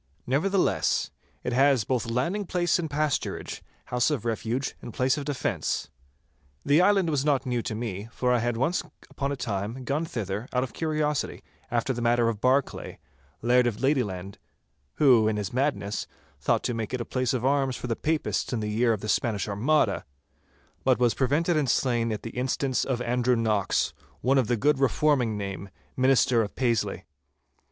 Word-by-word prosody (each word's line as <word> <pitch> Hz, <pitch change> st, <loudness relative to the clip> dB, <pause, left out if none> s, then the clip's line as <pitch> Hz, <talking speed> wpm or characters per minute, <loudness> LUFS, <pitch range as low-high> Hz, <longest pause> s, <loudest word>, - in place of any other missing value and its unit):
Nevertheless, 180 Hz, +9 st, +1 dB, 0.3 s
it 125 Hz, -, -2 dB
has 135 Hz, -2 st, +4 dB
both 120 Hz, +1 st, -1 dB
landing 170 Hz, -, -1 dB
place 175 Hz, -1 st, +1 dB
and 160 Hz, -2 st, -3 dB
pasturage, 150 Hz, 0 st, -2 dB, 0.2 s
house 125 Hz, +1 st, +1 dB
of 135 Hz, -7 st, -2 dB
refuge 115 Hz, +3 st, -2 dB
and 120 Hz, -, -7 dB
place 130 Hz, +1 st, +2 dB
of 145 Hz, -2 st, -5 dB
defence. 135 Hz, -, -2 dB, 0.7 s
The 145 Hz, +4 st, +5 dB
island 190 Hz, -3 st, +3 dB
was 140 Hz, -3 st, +1 dB
not 140 Hz, -2 st, +1 dB
new 125 Hz, -2 st, 0 dB
to 115 Hz, -2 st, -4 dB
me, 110 Hz, -2 st, -4 dB
for 125 Hz, +1 st, +1 dB
I 120 Hz, -, +3 dB
had 120 Hz, 0 st, -1 dB
once 145 Hz, +9 st, +1 dB, 0.3 s
upon 140 Hz, 0 st, -2 dB
a -, -, -1 dB
time 115 Hz, 0 st, -3 dB
gone 145 Hz, +5 st, -1 dB
thither 110 Hz, -, -4 dB
out 125 Hz, 0 st, +2 dB
of 125 Hz, -, -6 dB
curiosity 155 Hz, -3 st, -1 dB, 0.3 s
after 120 Hz, +2 st, 0 dB
the 120 Hz, -, -4 dB
matter 120 Hz, 0 st, +3 dB
of 110 Hz, -2 st, -4 dB
Barclay, 130 Hz, +2 st, 0 dB, 0.5 s
Laird 125 Hz, +1 st, +4 dB
of 110 Hz, -3 st, -2 dB
Ladyland—who, 110 Hz, -, 0 dB
in 110 Hz, -1 st, 0 dB
his 105 Hz, +1 st, -3 dB
madness, 125 Hz, -7 st, -1 dB, 0.3 s
thought 70 Hz, -, +1 dB
to -, -, -1 dB
make 115 Hz, +2 st, -3 dB
it 125 Hz, -, -3 dB
a -, -, -3 dB
place 130 Hz, -1 st, -1 dB
of 125 Hz, 0 st, -2 dB
arms 135 Hz, -1 st, +2 dB
for -, -, -6 dB
the 115 Hz, -2 st, -1 dB
Papists 155 Hz, +4 st, -1 dB
in 120 Hz, -, -1 dB
the 105 Hz, -1 st, -2 dB
year 115 Hz, +2 st, +2 dB
of 105 Hz, -, -4 dB
the 105 Hz, -, -5 dB
Spanish 105 Hz, -1 st, 0 dB
Armada, 120 Hz, +10 st, +1 dB, 0.8 s
but 130 Hz, -1 st, +3 dB
was 120 Hz, -2 st, +3 dB
prevented 150 Hz, +6 st, +1 dB
and 145 Hz, -4 st, +1 dB
slain 120 Hz, -2 st, +1 dB
at 105 Hz, -, -4 dB
the 115 Hz, -, -5 dB
instance 130 Hz, +1 st, 0 dB
of 125 Hz, -2 st, -1 dB
Andrew 125 Hz, +1 st, +2 dB
Knox, 110 Hz, -4 st, +1 dB, 0.3 s
one 135 Hz, +2 st, +3 dB
of 125 Hz, -, +1 dB
the 120 Hz, -, +1 dB
good 145 Hz, +4 st, +2 dB
reforming 135 Hz, -4 st, +2 dB
name, 100 Hz, -1 st, -5 dB, 0.3 s
minister 130 Hz, -2 st, +4 dB
of 105 Hz, -, -4 dB
Paisley. 110 Hz, -7 st, 0 dB
125 Hz, 180 wpm, -27 LUFS, 115-140 Hz, 0.8 s, The